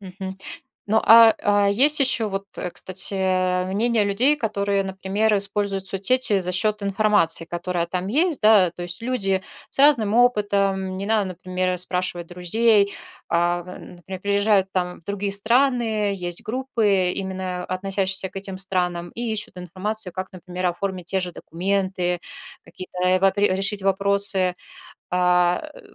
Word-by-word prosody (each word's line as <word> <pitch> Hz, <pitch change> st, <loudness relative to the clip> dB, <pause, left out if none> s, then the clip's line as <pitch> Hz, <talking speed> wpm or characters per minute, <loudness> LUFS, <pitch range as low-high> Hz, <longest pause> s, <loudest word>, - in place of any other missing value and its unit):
Мгм. 190 Hz, 0 st, -8 dB, 0.5 s
Ну, 220 Hz, +2 st, +3 dB
а 225 Hz, -1 st, +8 dB
а 205 Hz, 0 st, +3 dB
есть 280 Hz, +9 st, +3 dB
ещё 255 Hz, -5 st, +2 dB
вот, 195 Hz, 0 st, -4 dB, 0.3 s
кстати, 185 Hz, 0 st, 0 dB
мнение 215 Hz, +3 st, +1 dB
людей, 245 Hz, +9 st, +2 dB
которые, 200 Hz, -5 st, -1 dB
например, 195 Hz, +3 st, 0 dB
используют 200 Hz, -1 st, -1 dB
соцсети 200 Hz, +2 st, +2 dB
за 180 Hz, 0 st, -4 dB
счёт 210 Hz, +3 st, 0 dB
информации, 200 Hz, -5 st, +2 dB
которая 175 Hz, 0 st, -3 dB
там 180 Hz, +1 st, -4 dB
есть. 310 Hz, -, 0 dB
Да, 210 Hz, -5 st, +5 dB
то 175 Hz, -, -9 dB
есть, 175 Hz, +3 st, -5 dB
люди 200 Hz, -6 st, -1 dB, 0.3 s
с -, -, -9 dB
разным 235 Hz, -8 st, +4 dB
опытом, 200 Hz, -5 st, +1 dB
не 195 Hz, +1 st, -5 dB
надо, 215 Hz, -1 st, +2 dB
например, 185 Hz, 0 st, -3 dB
спрашивать 180 Hz, -1 st, -3 dB
друзей, 200 Hz, +3 st, +2 dB, 0.3 s
а, 175 Hz, +1 st, 0 dB
например, 180 Hz, +1 st, -10 dB
приезжают 200 Hz, 0 st, +2 dB
там 180 Hz, -1 st, -2 dB
в -, -, -33 dB
другие 200 Hz, +1 st, -3 dB
страны, 225 Hz, -1 st, +1 dB
есть 175 Hz, -2 st, -6 dB
группы, 215 Hz, -7 st, 0 dB
именно 185 Hz, -1 st, -4 dB
относящиеся 190 Hz, +1 st, -1 dB
к 195 Hz, -, -17 dB
этим 195 Hz, -1 st, -6 dB
странам, 180 Hz, -2 st, -2 dB
и 235 Hz, -1 st, -4 dB
ищут 205 Hz, -3 st, -6 dB
информацию, 185 Hz, +2 st, -2 dB
как, 185 Hz, +1 st, -6 dB
например, 180 Hz, 0 st, -5 dB
оформить 180 Hz, 0 st, -3 dB
те 190 Hz, -, +1 dB
же 180 Hz, -1 st, -5 dB
документы, 180 Hz, 0 st, -2 dB, 0.4 s
какие-то, 185 Hz, 0 st, -10 dB
э, 185 Hz, 0 st, +3 dB
вапре 195 Hz, 0 st, +2 dB
решить 200 Hz, +1 st, -1 dB
вопросы. 195 Hz, -1 st, +3 dB, 0.6 s
А, 180 Hz, -, +2 dB
э, -, -, -13 dB
195 Hz, 145 wpm, -22 LUFS, 180-210 Hz, 0.6 s, а